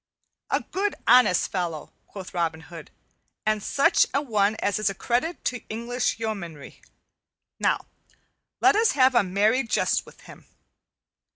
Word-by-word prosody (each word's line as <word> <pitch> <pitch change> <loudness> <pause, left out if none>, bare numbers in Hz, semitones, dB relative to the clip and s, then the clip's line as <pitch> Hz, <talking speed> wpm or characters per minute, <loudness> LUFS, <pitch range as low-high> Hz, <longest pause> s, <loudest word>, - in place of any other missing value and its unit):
"A - - +1
good 400 +1 -2
honest 250 -8 +5
fellow," 170 -5 -4
quoth 195 -2 -10
Robin 165 -2 -2
Hood, 160 -1 -11 0.6
"and 215 -1 +1
such 275 +7 +3
an 285 +1 0
one 210 -3 +1
as 205 -1 -1
is 215 - +1
a 195 - -5
credit 250 - -2
to 245 -1 -2
English 235 +2 -2
yeomanrie. 195 -10 -6 0.8
Now - - 0 0.8
let 395 +2 +5
us 445 0 +3
have 260 -1 +4
a 240 - +5
merry 205 +6 +2
jest 235 - 0
with - - -16
him. - - -15
215 Hz, 145 wpm, -25 LUFS, 185-255 Hz, 0.8 s, honest